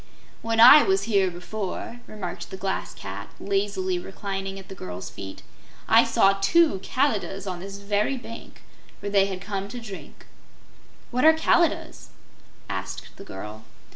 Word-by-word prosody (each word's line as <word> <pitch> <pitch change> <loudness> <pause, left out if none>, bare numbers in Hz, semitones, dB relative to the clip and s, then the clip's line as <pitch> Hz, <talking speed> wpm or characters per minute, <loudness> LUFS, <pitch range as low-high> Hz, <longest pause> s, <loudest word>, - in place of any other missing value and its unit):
"When 225 0 -1
I 255 +6 +11
was 195 -4 +2
here 200 -3 +2
before," 195 +6 -5
remarked 200 -5 -6
the 190 - -7
Glass 190 0 -3
Cat, - - -7
lazily 195 -2 -1
reclining 195 +1 -5
at 190 -1 -10
the - - -8
girl's 90 - -7
feet, 95 -1 -9 0.4
"I - - +7
saw 195 0 +3
two 305 - +4
Kalidahs 205 -4 -1
on 185 -2 -4
this 195 +2 -7
very 205 +6 0
bank, 230 -2 -10 0.4
where 200 - -5
they 195 -1 +4
had 190 -2 -5
come 195 -1 -4
to 245 +4 -7
drink." 210 -5 -10 0.9
"What 250 +1 0
are 320 +1 +8
Kalidahs?" 330 +1 +1 0.6
asked - - -5
the - - -9
girl. 105 - -8
195 Hz, 150 wpm, -25 LUFS, 190-220 Hz, 0.9 s, I